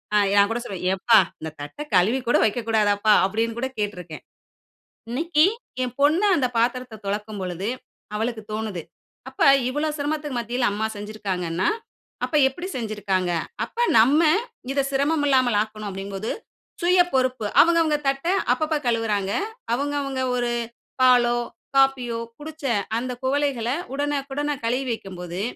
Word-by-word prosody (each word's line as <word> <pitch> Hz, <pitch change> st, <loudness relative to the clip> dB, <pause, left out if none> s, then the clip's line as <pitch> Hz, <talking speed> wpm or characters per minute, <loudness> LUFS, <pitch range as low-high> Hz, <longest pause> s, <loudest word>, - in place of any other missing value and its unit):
அ -, -, +6 dB, 0.2 s
நான் 200 Hz, +1 st, +5 dB
கூட 235 Hz, -, -1 dB
சொல்வேன், 190 Hz, -6 st, -6 dB
"எப்பா 220 Hz, +4 st, +4 dB, 0.2 s
இந்த 160 Hz, 0 st, -5 dB
தட்ட 145 Hz, 0 st, -8 dB, 0.2 s
கழுவி 215 Hz, +9 st, +3 dB
கூட 240 Hz, -, +4 dB
வைக்க 225 Hz, +3 st, 0 dB
கூடாதப்பா?" 210 Hz, -1 st, +3 dB
அப்படின்கூட 230 Hz, +5 st, -1 dB
கேட்டுருக்கேன். 180 Hz, -6 st, -4 dB, 0.9 s
இன்னைக்கு 310 Hz, +5 st, +3 dB, 0.4 s
என் 250 Hz, 0 st, -4 dB
பொண்ணு 315 Hz, +8 st, +4 dB
அந்த 255 Hz, -4 st, +2 dB
பாத்திரத்த 240 Hz, -1 st, -1 dB
தொலக்கும் 210 Hz, +1 st, -3 dB
பொழுது 185 Hz, +3 st, -3 dB, 0.5 s
அவளுக்குத் 220 Hz, -1 st, -3 dB
தோணுது. 215 Hz, -5 st, -3 dB, 0.5 s
அப்ப 265 Hz, -, -11 dB, 0.3 s
இவ்வளோ 295 Hz, +4 st, -1 dB
சிரமத்துக்கு 295 Hz, -2 st, -2 dB
மத்தியில 240 Hz, +1 st, 0 dB
அம்மா 220 Hz, +2 st, -1 dB
செஞ்சுருக்காங்கன்னா, 190 Hz, -5 st, -3 dB, 0.6 s
அப்ப 305 Hz, -, -5 dB
எப்டி 350 Hz, +8 st, -5 dB
செஞ்சுருக்காங்க. 205 Hz, -6 st, -1 dB, 0.3 s
அப்ப -, -, -22 dB, 0.2 s
நம்ம 275 Hz, +8 st, +5 dB, 0.5 s
இத 275 Hz, 0 st, +1 dB
சிரமம் 290 Hz, +3 st, +1 dB
இல்லாமல் 255 Hz, -5 st, +3 dB
ஆக்கணும் 215 Hz, -1 st, -5 dB
அப்படிங்குபோது, 195 Hz, +2 st, -5 dB, 0.5 s
சுய 355 Hz, +1 st, +5 dB
பொறுப்பு 255 Hz, -4 st, +1 dB, 0.2 s
அவங்க 335 Hz, 0 st, +4 dB
அவங்க 305 Hz, -2 st, +2 dB
தட்ட 275 Hz, +4 st, 0 dB, 0.3 s
அப்பப்ப 310 Hz, 0 st, -1 dB
கழுவுறாங்க. 215 Hz, -4 st, 0 dB, 0.4 s
அவங்க 285 Hz, +3 st, -1 dB
அவங்க 270 Hz, -2 st, -3 dB
ஒரு 240 Hz, -1 st, 0 dB, 0.5 s
பாலோ, 245 Hz, -2 st, +5 dB, 0.4 s
காஃபியோ 255 Hz, -4 st, +2 dB, 0.2 s
குடிச்ச 310 Hz, 0 st, -10 dB, 0.4 s
அந்த 255 Hz, +1 st, -4 dB
குவளைகள, 265 Hz, -3 st, 0 dB, 0.3 s
உடனுக்குடன 290 Hz, 0 st, -2 dB
கழுவி 250 Hz, +3 st, 0 dB
வைக்கும்போது, 180 Hz, -4 st, -6 dB
240 Hz, 130 wpm, -23 LUFS, 205-275 Hz, 0.9 s, அ